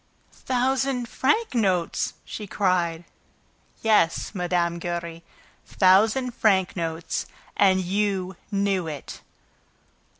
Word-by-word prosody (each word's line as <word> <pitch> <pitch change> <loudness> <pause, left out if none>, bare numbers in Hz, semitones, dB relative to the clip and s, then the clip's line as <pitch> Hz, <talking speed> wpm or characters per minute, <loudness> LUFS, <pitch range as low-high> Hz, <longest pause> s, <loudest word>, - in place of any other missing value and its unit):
"Thousand 260 0 0
franc 290 - 0
notes!" 190 -7 0
she 210 - -7
cried. 175 -4 0 0.8
"Yes, 215 -6 +2
Mme. 175 -2 0
Giry, 170 -1 -4 0.5
thousand 215 +7 +3
franc 190 -5 +2
notes! 165 -1 -3 0.3
And 190 -2 +4
you 190 0 -1 0.2
knew 195 -3 0
it!" 150 -3 -7
190 Hz, 90 wpm, -25 LUFS, 175-220 Hz, 0.8 s, And